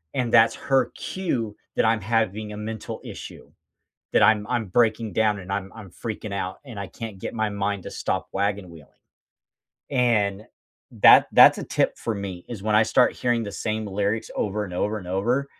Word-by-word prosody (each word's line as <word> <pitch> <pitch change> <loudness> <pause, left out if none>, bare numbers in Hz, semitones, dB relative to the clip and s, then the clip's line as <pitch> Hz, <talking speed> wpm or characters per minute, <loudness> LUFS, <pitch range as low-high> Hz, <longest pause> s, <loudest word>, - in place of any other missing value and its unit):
And 120 -3 -1
that's 115 -1 +6
her 135 -2 +1
cue 120 - -3 0.2
that - - +2
I'm 110 -1 +2
having 110 0 -1
a 105 - -7
mental 110 0 -6
issue, - - -10 0.6
that - - +4
I'm 105 -1 +4
I'm 120 -4 -1
breaking 110 +1 +1
down 110 -2 +2
and 90 0 -10
I'm 95 -1 -3
I'm 110 -3 -10
freaking 105 +1 -6
out 95 -1 -4
and 115 -5 -9
I 100 - -4
can't 110 -4 -8
get - - -5
my 110 -1 0
mind 100 -1 -2
to - - -6
stop - - -3
wagon-wheeling. 95 -6 -4 0.9
And 110 -6 +1 0.5
that - - +7
that's - - +8
a - - -4
tip - - 0
for 115 - -2
me 95 -3 -6
is 110 -5 -7
when 110 -1 +1
I 110 - +6
start 125 +2 +3
hearing 120 -2 0
the 100 - -6
same 110 -1 -3
lyrics 100 +3 -1
over 105 +1 -1
and 90 -3 -8
over 105 +4 -1
and 90 - -11
over, 120 +9 0
105 Hz, 190 wpm, -24 LUFS, 100-115 Hz, 0.9 s, that's